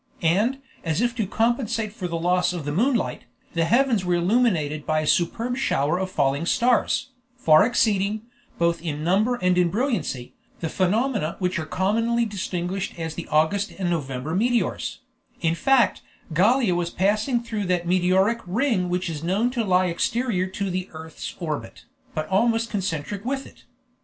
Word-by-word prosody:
And, 205 +11 +2 0.3
as 160 0 -1
if 240 +1 +1
to 215 -4 0
compensate 225 -1 0
for 190 -5 -4
the 170 -1 -3
loss 180 +2 +1
of 170 -5 -5
the 145 - -2
moonlight, 215 - 0 0.3
the 165 -1 +1
heavens 235 +1 +3
were 180 -1 +1
illuminated 175 -6 +1
by 155 0 +1
a - - -3
superb 230 +11 +1
shower 155 - +1
of 190 0 -2
falling 145 0 0
stars, 250 +3 +2 0.3
far 155 -9 +6
exceeding, 215 -2 +1 0.3
both 170 -1 +1
in 155 -3 -4
number 205 +8 +2
and 180 -5 +2
in 175 -1 +3
brilliancy, 220 - -2 0.3
the 165 - -3
phenomena 205 - 0
which 180 -1 -1
are 155 - -5
commonly 230 +7 +1
distinguished 190 -2 -3
as 160 -1 -4
the 170 - -7
August 160 +7 +1
and 185 -2 -1
November 140 -2 -3
meteors; 235 +5 0 0.4
in 165 -1 +1
fact, 260 +7 +3 0.3
Gallia 215 +4 +3
was 175 0 -1
passing 215 +7 +1
through 220 -3 -3
that 180 -1 0
meteoric 185 +5 +2
ring 200 -2 +1
which 180 +1 -1
is 160 -2 -5
known 200 +8 +1
to 240 -2 -1
lie 185 -2 +3
exterior 185 +2 0
to 195 0 -3
the 185 +1 -3
earth's 160 0 -8
orbit, 155 -4 -5 0.3
but 155 - -2
almost 225 +3 +2
concentric 190 -1 -3
with 270 +2 -2
it. - - -17
185 Hz, 165 wpm, -24 LUFS, 170-230 Hz, 0.4 s, far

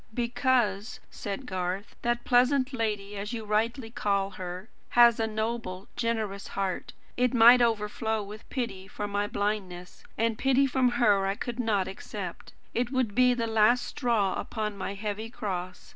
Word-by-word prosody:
"Because," 235 -4 +1
said 205 +6 -5
Garth, 185 -1 -3
"that 240 0 0
pleasant 255 +2 +3
lady, 210 -4 -2
as 205 +3 -4
you 225 -2 -4
rightly 225 +3 0
call 200 -3 0
her, 185 +1 -7 0.3
has 235 -1 +7
a 225 - +1
noble, 220 -3 -3
generous 220 -4 -2
heart, 195 -2 -2 0.2
and 250 - +2
it 250 - 0
might 240 +2 +8
overflow 220 -1 0
with 210 +2 -11
pity 200 -8 -4
for 205 +1 -5
my 205 0 -1
blindness; 195 -4 -3
and 225 0 0
pity 270 +1 +4
from 260 -1 +2
her 200 -4 +3
I 195 - 0
could 240 +3 -5
not 210 -6 +1
accept. 190 -2 -7 0.2
It 245 +1 -1
would 255 -6 0
be 250 +2 +4
the 230 -1 -1
last 225 +2 +3
straw 225 -7 0
upon 215 -2 -3
my 200 0 -4
heavy 210 +2 -4
cross. 185 -5 -5
220 Hz, 160 wpm, -28 LUFS, 200-240 Hz, 0.3 s, might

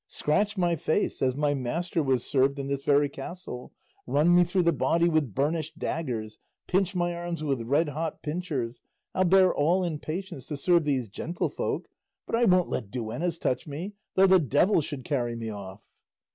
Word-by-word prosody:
Scratch 205 +7 0
my 175 -2 +2
face, 165 +5 -1
as 130 -1 +2
my 145 0 +1
master 160 +6 -1
was 130 -4 +1
served 140 0 +2
in 140 - -3
this 140 0 -2
very 145 0 +4
castle; 140 -2 -8 0.4
run 160 +5 +4
me 175 - +7
through 180 +1 +1
the 170 0 +3
body 165 +5 +2
with 155 - +1
burnished 155 +3 -1
daggers; 120 -11 -3 0.3
pinch 190 +1 +1
my 175 -1 0
arms 170 -2 -4
with 135 -5 0
red 145 +7 +1
hot 155 +2 -4
pincers; 150 -7 -3 0.3
I'll 185 - +2
bear 185 0 +5
all 170 +6 +2
in 165 -4 -2
patience 170 -4 -6
to 150 - -4
serve 170 +2 +3
these 135 -5 0
gentlefolk; 160 - -3 0.4
but - - -1
I 240 +1 +3
won't 180 -3 +4
let 100 - -3
duennas 125 - -3
touch 130 -1 -1
me, 165 +8 -5 0.2
though 190 - +6
the 190 -1 +6
devil 160 - +3
should 140 -4 -6
carry 120 -5 -1
me 115 -1 -4
off!" 100 -1 -9
155 Hz, 185 wpm, -27 LUFS, 135-175 Hz, 0.4 s, me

